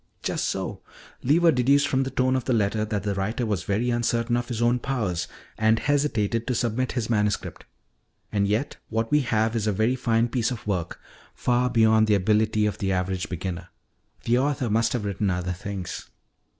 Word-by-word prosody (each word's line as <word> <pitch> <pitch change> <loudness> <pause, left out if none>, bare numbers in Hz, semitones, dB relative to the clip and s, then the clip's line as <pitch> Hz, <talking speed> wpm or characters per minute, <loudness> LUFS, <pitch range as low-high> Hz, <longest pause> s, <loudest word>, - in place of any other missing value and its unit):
"Just - - -1
so. - - -3 0.4
Lever 165 +5 +4
deduced 140 +2 +3
from 135 -1 +1
the 135 - -1
tone 130 0 +1
of 130 - -1
the 130 - +1
letter 105 0 +1
that 105 -3 -3
the 100 -1 -1
writer 105 +5 -2
was 100 -5 -2
very 115 +5 0
uncertain 120 0 0
of 120 0 -1
his 120 -3 -4
own 120 +1 +2
powers 100 -11 -2 0.3
and 110 +1 +4
hesitated 115 -6 0
to 125 - 0
submit 120 +2 -1
his 120 -4 -2
manuscript. 105 -3 -1 0.7
And 100 -1 +1
yet, 110 +8 -1
what 115 0 -1
we 150 - +5
have 115 -4 0
is 110 -2 -1
a - - +3
very 110 +5 +1
fine 115 -2 +1
piece 120 -2 0
of 125 -4 -6
work, 95 -5 -2 0.4
far 125 0 +1
beyond 110 -2 +4
the 105 - +4
ability 105 +2 +2
of 105 - -2
the 95 -1 0
average 90 -1 -1
beginner. 90 -1 -5 0.5
The 120 +2 +2
author 135 -4 0
must 115 +1 +2
have 120 -4 -2
written 100 0 -1
other 90 0 -1
things. 95 0 -6
110 Hz, 190 wpm, -25 LUFS, 100-125 Hz, 0.7 s, we